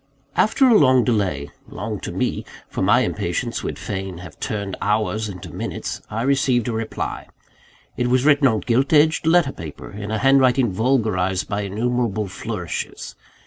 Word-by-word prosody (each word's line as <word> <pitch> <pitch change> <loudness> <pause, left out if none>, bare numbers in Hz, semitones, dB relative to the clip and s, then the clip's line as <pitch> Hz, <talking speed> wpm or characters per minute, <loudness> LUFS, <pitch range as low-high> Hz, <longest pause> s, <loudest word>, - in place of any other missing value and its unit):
After 260 +5 +4
a 240 - +6
long 130 -3 +5
delay 95 - -1 0.2
long - - -5
to - - -6
me; - - -1 0.2
for - - -5
my - - +4
impatience - - -2
would - - -4
fain 95 -2 -5
have 90 -1 -11
turned 100 -5 -3
hours 105 +1 0
into 90 -3 -9
minutes - - -4
I 110 +2 -2
received 130 -3 +2
a - - 0
reply. 110 0 -4 0.7
It 125 - +1
was 125 +2 +2
written 145 -2 +5
on 110 -4 +1
gilt 130 +5 +1
edged 155 +1 +4
letter 165 -4 +4
paper, 80 - -9
in 100 0 -6
a 110 - 0
handwriting 130 -2 +4
vulgarised 95 -5 +1
by 100 0 -2
innumerable 110 +1 -1
flourishes. 95 - -5
115 Hz, 160 wpm, -22 LUFS, 100-135 Hz, 0.7 s, a